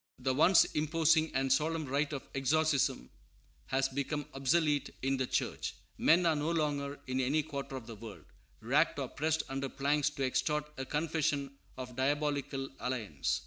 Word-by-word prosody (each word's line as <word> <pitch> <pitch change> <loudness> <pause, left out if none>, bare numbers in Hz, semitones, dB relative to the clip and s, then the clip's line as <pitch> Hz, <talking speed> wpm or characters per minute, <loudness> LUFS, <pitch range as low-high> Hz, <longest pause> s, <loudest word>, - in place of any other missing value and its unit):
The 130 +1 0
once 165 +6 +6
imposing 160 +1 +2
and 135 0 +3
solemn 155 +3 0
rite 145 +3 0
of 140 -3 -5
exorcism 140 - +1 0.6
has 135 0 +1
become 140 +2 -3
obsolete 145 +1 +1
in 135 0 +1
the 130 -1 -1
Church. - - -2 0.2
Men 175 +2 +4
are 165 -2 +4
no 150 +2 -1
longer, 145 -3 -1
in 130 0 -2
any 145 +4 +1
quarter 140 -2 -5
of 130 -4 -6
the 115 - -8
world, 110 -1 -10 0.4
racked - - +2
or - - -3
pressed 160 +1 0
under 135 0 -3
planks 145 +2 +1
to 140 -2 -2
extort 150 +3 0
a 130 - -3
confession 150 -2 -1 0.2
of 125 -1 -7
diabolical 140 0 -1
alliance. 115 - -2
140 Hz, 160 wpm, -32 LUFS, 130-155 Hz, 0.6 s, once